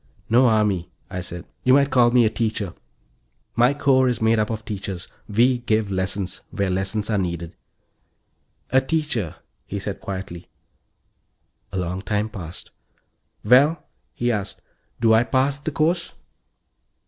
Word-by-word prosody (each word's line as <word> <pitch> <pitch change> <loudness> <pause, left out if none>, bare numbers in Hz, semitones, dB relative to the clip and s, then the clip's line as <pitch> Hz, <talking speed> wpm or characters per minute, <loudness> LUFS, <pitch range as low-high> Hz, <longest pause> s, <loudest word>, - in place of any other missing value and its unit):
"No 125 +2 +6
army," 105 -6 +1 0.2
I 90 - -3
said. 90 -1 -7 0.2
"You 130 - +5
might 140 0 +4
call 125 -2 +5
me 120 -1 +4
a - - +4
teacher; 110 -6 -2 0.8
my 125 +4 +4
corps 130 -2 +3
is 125 -3 0
made 110 0 +3
up 105 - 0
of 110 -1 -4
teachers. 95 -3 -5 0.2
We 120 +4 +3
give 110 -4 0
lessons 95 0 -2
where 100 -2 -1
lessons 100 +4 0
are 105 - +2
needed." 85 -2 -3 1.2
"A 130 +1 +5
teacher," 135 - -1 0.3
he 100 - -4
said 100 0 -5
quietly. 95 -3 -6 1.2
A 95 - -4
long 90 +1 -2
time 105 +1 -1
passed. 90 -5 -8 0.7
"Well," 140 +8 +5 0.3
he 120 0 0
asked, 100 -3 -3 0.4
"do 115 -1 +4
I 110 +1 +5
pass 135 +3 +1
the 145 - -3
course?" 165 +3 0
110 Hz, 145 wpm, -23 LUFS, 95-125 Hz, 1.2 s, No